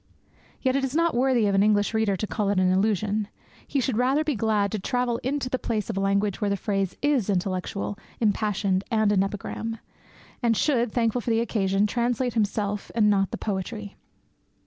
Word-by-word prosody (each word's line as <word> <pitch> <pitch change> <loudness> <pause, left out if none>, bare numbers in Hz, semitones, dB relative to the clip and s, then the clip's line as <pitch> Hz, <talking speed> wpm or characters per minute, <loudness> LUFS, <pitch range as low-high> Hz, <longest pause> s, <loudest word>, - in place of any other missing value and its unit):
Yet 260 -1 +2
it 275 - +1
is 270 +1 -2
not 335 0 +2
worthy 245 -2 +2
of 200 - +2
an 195 - +4
English 205 +1 +2
reader 220 -3 +1
to 215 - -2
call 210 -1 -1
it 200 -2 +2
an 185 0 +3
illusion; 210 +1 +1 0.4
he 280 - 0
should 255 -3 0
rather 265 +5 +2
be 305 -1 0
glad 210 -3 +1
to 215 - -2
travel 245 +3 0
into 265 +1 -2
the 255 0 -2
place 220 -2 -2
of - - -7
a - - -1
language 200 +1 0
where 205 - +1
the 200 - 0
phrase 195 -2 -1
is 280 -8 +2
intellectual, 195 +1 -2 0.2
impassioned, 205 -3 +1
and 220 -3 +2
an 195 -2 +3
epigram; 210 +3 -4 0.6
and 230 -3 +2
should 245 -6 +1
thankfully 235 +1 +1
for 235 - -4
the 225 0 +3
occasion 200 -4 +1
translate 240 +2 0
himself, 210 -2 -1
and 210 -2 +4
not 195 -1 +2
the - - -5
poetry. 205 +1 -4
215 Hz, 195 wpm, -25 LUFS, 200-240 Hz, 0.6 s, an